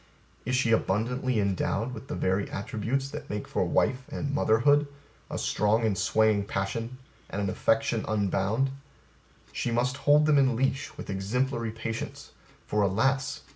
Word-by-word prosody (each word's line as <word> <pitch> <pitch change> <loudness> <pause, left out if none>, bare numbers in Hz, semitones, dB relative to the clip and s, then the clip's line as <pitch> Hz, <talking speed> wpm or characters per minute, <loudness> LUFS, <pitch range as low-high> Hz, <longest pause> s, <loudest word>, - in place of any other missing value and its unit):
Is 130 - +1
she 125 -3 +2
abundantly 115 +3 +1
endowed 100 +4 0
with 135 - -9
the - - -4
very 95 +2 0
attributes 115 +7 -2
that 150 -1 -7
make 105 0 -4
for - - 0
wife 130 - +1
and 140 -1 -3
mother 110 -6 +3
hood, 145 +2 +4 0.4
a - - -4
strong 110 +2 +1
and 105 -3 +1
swaying 110 +1 +2
passion 115 +6 -3 0.3
and 100 - -4
an 100 -2 0
affection 115 +2 +1
unbounded, 105 +5 0 0.8
she - - -2
must 125 +2 0
hold 145 +1 +4
them 150 -2 +5
in 130 -3 +3
leash 135 +2 -1
with - - -6
exemplary 115 +5 -1
patience; 115 0 -5 0.3
for, 105 - 0
alas! 130 +8 +1
115 Hz, 155 wpm, -28 LUFS, 105-130 Hz, 0.8 s, them